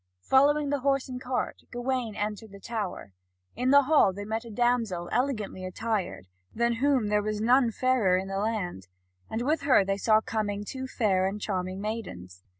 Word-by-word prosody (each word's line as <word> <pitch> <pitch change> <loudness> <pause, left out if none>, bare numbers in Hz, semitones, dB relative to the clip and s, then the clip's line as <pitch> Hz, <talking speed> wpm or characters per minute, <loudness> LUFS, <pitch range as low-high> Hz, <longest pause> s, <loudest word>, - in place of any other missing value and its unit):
Following 285 +2 +4
the 285 - +1
horse 275 0 +1
and 255 -1 -6
cart, 255 0 -3
Gawain 245 -3 -2
entered 210 +1 -4
the 200 - -11
tower. 210 - -5 0.4
In 250 +1 0
the 280 +1 +7
hall 290 -8 +4
they 205 +2 -7
met 220 +2 -3
a - - -9
damsel 225 -6 0
elegantly 230 -8 -1
attired, 190 - -3 0.3
than 235 0 +1
whom 260 -4 +2
there 210 0 +2
was 215 0 -2
none 245 +3 +4
fairer 230 -6 +2
in 190 +1 -3
the 195 0 -3
land, 200 - -3 0.4
and 225 +2 -2
with 305 +5 +1
her 260 -8 +4
they 195 0 0
saw 215 +1 +4
coming 210 -2 -3
two 260 +4 -5
fair 190 -7 +1
and 200 +2 -4
charming 185 -2 -3
maidens. 95 - -6
220 Hz, 180 wpm, -28 LUFS, 200-255 Hz, 0.4 s, the